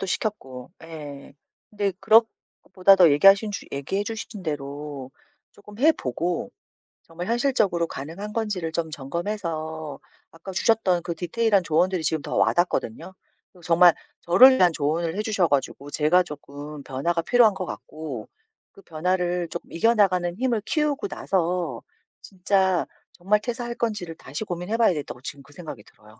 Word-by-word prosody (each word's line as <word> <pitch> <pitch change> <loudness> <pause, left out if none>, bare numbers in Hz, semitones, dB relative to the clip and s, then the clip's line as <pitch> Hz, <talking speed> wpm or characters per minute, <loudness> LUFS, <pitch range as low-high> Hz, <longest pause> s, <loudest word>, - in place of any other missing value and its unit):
구체화도 - - -1
시켰고. 135 - -4
예. 145 -4 -10 0.4
근데 205 -2 -1
그런 225 +1 +6 0.4
것보다도 185 -4 +5
얘기하신 195 +8 +5
주 200 - -6
얘기해 165 +9 -2
주신 220 -2 -6
대로 145 -3 -5 0.4
쪼끔 205 +1 -15
해보고 180 - 0 0.5
정말 175 +2 -8
현실적으로 230 -9 +1
가능한 170 +11 -7
건지를 205 -8 -2
좀 160 0 -2
점검해서 160 -1 -4 0.3
아까 165 +4 -10
주셨던 190 -3 +2
그 170 -1 -4
디테일한 200 +4 +1
조언들이 175 +2 +1
지금 155 0 0
더 - - -5
와닿거든요. 175 -2 0 0.4
어 180 - -17
정말 170 0 +6 0.3
저를 255 +10 +7
위한 180 -5 +5
조언을 160 +3 -1
해주셔 210 -5 +1
가지고 140 0 -2
제가 155 +5 +3
조끔 145 -2 -9
변화가 165 +7 -1
필요한 235 +2 +5
것 190 -1 -5
같고 155 -9 -7 0.4
그 195 - -17
변화를 180 +1 -1
조끔 170 - -8
이겨나가는 185 -3 +2
힘을 235 -1 0
키우고 300 +4 0
나서 175 - -2 0.4
진짜 190 -1 +1 0.3
정말 195 +4 +1
퇴사할 240 +1 -4
건지를 210 -8 -3
다시 145 +7 -6
고민해 180 +3 -3
봐야 230 - +5
되겠다고 150 -7 -4
지금 140 +1 -8
그 145 - -19
생각이 150 - -9
들어요. 105 +1 -20
175 Hz, 345 characters per minute, -24 LUFS, 155-205 Hz, 0.5 s, 저를